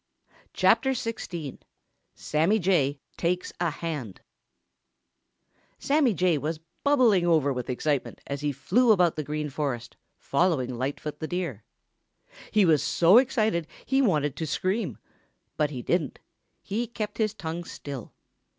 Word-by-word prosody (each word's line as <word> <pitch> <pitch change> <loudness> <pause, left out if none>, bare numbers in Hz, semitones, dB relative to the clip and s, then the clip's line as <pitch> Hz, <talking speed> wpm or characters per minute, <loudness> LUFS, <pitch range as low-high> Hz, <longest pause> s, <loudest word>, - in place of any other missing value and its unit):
CHAPTER 265 0 +3
XXXVI 175 - -5 0.6
SAMMY 165 +8 +1
JAY 160 -8 +1 0.2
TAKES 180 +1 -1
A 175 -1 +1
HAND 150 - -5 1.6
Sammy 275 -6 +2
Jay 175 -3 +2
was 155 +2 -3 0.2
bubbling 240 -11 +4
over 155 -5 +3
with 125 -1 -5
excitement 140 +2 -1
as 140 0 -4
he 150 0 0
flew 235 - +3
about 180 -5 +4
through 155 - -3
the 150 - -10
Green 150 -1 -3
Forest, 130 -5 -3 0.2
following 140 -5 +1
Lightfoot 140 +4 -4
the 155 - -3
Deer. 170 - -3 0.9
He 210 -2 +4
was 155 -4 +4
so 180 +7 +6
excited 220 - +1 0.2
he 270 +1 +2
wanted 150 - +1
to 160 - -3
scream. 185 +9 -1 0.6
But 150 -1 +1
he 130 -4 -6
didn't. 160 -3 0 0.5
He 225 +4 -2
kept 215 -2 -5
his 215 -2 +1
tongue 165 +1 -5
still. 140 -7 -8
165 Hz, 135 wpm, -27 LUFS, 145-200 Hz, 1.6 s, so